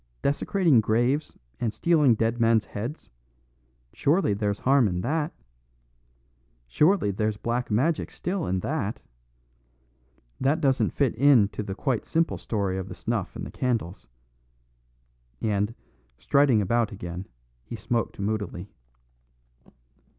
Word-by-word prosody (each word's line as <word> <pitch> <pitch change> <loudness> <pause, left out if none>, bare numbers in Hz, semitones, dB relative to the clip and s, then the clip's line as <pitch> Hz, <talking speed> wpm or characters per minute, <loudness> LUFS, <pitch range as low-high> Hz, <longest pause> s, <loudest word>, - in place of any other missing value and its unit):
Desecrating 150 - +3
graves 120 +8 0 0.2
and 115 - 0
stealing 150 -4 +3
dead 115 +2 0
men's 115 -1 +3
heads 115 +9 -6 0.8
surely 150 - +2
there's 100 0 -1
harm 135 -3 +4
in 90 -2 -2
that? 155 - -1 1.4
Surely 155 - +3
there's 105 +1 -1
black 120 +3 -2
magic 140 +10 +1
still 180 0 -3
in 95 0 -1
that? 120 - -3 1.4
That 140 +5 +2
doesn't 135 -4 +2
fit 140 -5 0
in 125 -4 +5
to - - -5
the 100 -2 -5
quite 125 -1 -1
simple 165 +1 0
story 100 -4 -2
of 95 - -5
the - - -8
snuff - - -3
and - - -5
the - - -8
candles." 115 -8 -2 1.3
And, 105 +1 -1 0.4
striding 125 - +3
about 115 +2 +1
again, 90 -1 -7 0.4
he 90 - -7
smoked 115 0 -2
moodily. 100 -2 -3
115 Hz, 120 wpm, -26 LUFS, 105-140 Hz, 1.4 s, in